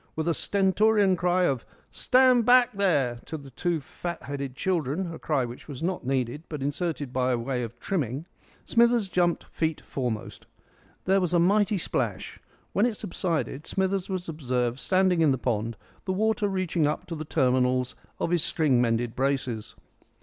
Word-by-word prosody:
With 160 +1 -2
a 170 - +3
stentorian 200 +1 +3
cry 180 +1 +2
of 135 -8 +1 0.3
"Stand 255 -2 +4
back, 250 +1 +5
there!" 145 - +1
to 160 - -5
the 140 -2 -12
two 170 +5 -1
fat 170 +3 -6
headed 140 -2 -5
children 170 +1 -1
a - - -8
cry 140 -5 0
which 120 +1 -9
was 145 -1 -7
not 185 +1 -1
needed, 130 +1 -1
but 150 -4 -4
inserted 145 -2 -2
by 125 -1 +1
way 125 +2 -2
of 120 0 -6
trimming 145 - -2 0.4
Smithers 235 -3 +3
jumped 175 -1 +1
feet 160 -1 -2
foremost. 120 -5 -4 0.6
There 195 +1 +3
was 180 -1 0
a - - +5
mighty 205 +4 +3
splash. 175 - -3 0.3
When 210 +4 +3
it 225 -4 -3
subsided, 160 -6 -3
Smithers 190 0 -1
was 185 -2 -3
observed 125 -5 -1
standing 185 -1 +2
in 160 - +5
the 135 - +2
pond, 115 -2 -2 0.3
the 190 - 0
water 220 +2 +1
reaching 185 -5 0
up 150 - -2
to 170 - -6
the 155 - -5
terminals 130 -3 +1 0.3
of 170 - -1
his 175 -2 +2
string 140 -7 +2
mended 115 -1 0
braces. 130 -5 -1
160 Hz, 170 wpm, -27 LUFS, 130-185 Hz, 0.6 s, back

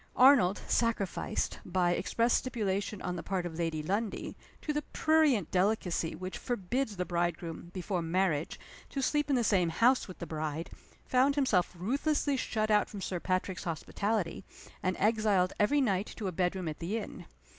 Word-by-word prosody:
Arnold, 250 -8 +6
sacrificed 230 -5 0
by 180 -1 +1
express 230 +6 +1
stipulation 210 -5 -1
on 180 - -2
the - - -4
part 185 -1 -2
of 165 -1 -6
Lady 160 -2 -1
Lundie 205 +6 -2 0.3
to 300 - -1
the 295 - 0
prurient 300 - +2
delicacy 185 -3 +1
which 185 +3 -6
forbids 240 0 -2
the 180 - -1
bridegroom, 170 -1 -2
before 185 0 -2
marriage, 165 -2 0 0.3
to 275 - -3
sleep 295 +2 +1
in 275 - +3
the 245 - +2
same 185 -6 +3
house 240 +10 +3
with 185 - -9
the 170 - -5
bride, 155 0 -4 0.3
found 265 +2 +3
himself 210 -12 +2
ruthlessly 280 - 0
shut 220 -4 -1
out 210 -1 +3
from 205 - -7
Sir 185 -2 -3
Patrick's 185 +1 -2
hospitality, 185 +3 -2 0.4
and 185 0 0
exiled 210 -3 +2
every 285 +8 +3
night 200 -5 +1
to 215 - -5
a - - -1
bedroom 180 0 -1
at 155 - -4
the 185 +7 -2
inn. 220 - -7
195 Hz, 165 wpm, -31 LUFS, 175-230 Hz, 0.4 s, Arnold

